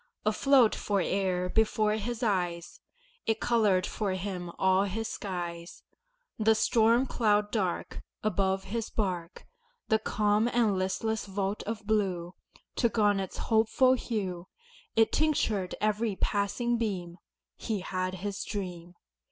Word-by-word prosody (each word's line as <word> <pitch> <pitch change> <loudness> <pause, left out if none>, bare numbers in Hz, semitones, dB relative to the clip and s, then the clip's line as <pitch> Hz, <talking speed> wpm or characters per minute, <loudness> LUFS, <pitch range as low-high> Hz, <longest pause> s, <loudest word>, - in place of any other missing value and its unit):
Afloat 240 +2 +4
fore'er 190 -2 0
before 215 +1 +2
his 225 +3 -3
eyes, 175 -5 -1 0.5
It 225 0 +1
colored 210 -6 +2
for 205 -3 -2
him 185 -2 -4
all 190 +1 +3
his 220 +3 -3
skies: 175 -4 -6 0.6
The 220 0 +4
storm 230 +3 +3
cloud 210 -4 +1
dark 190 -6 -2 0.2
Above 195 -2 +1
his 225 +3 -4
bark, 180 -5 -3 0.4
The 220 - +4
calm 210 +1 +1
and 235 -4 +2
listless 205 +4 -1
vault 195 +1 -2
of 215 -1 -4
blue 190 -5 0 0.4
Took 235 -1 +1
on 205 -2 +4
its 190 -1 -5
hopeful 225 +3 +3
hue, 190 -8 -3 0.5
It 225 0 +4
tinctured 225 -11 +1
every 215 0 0
passing 225 +5 0
beam 180 -6 -3 0.4
He 215 -4 -3
had 185 0 -3
his 200 +2 -4
dream. 180 -4 -6
205 Hz, 125 wpm, -29 LUFS, 185-220 Hz, 0.6 s, Afloat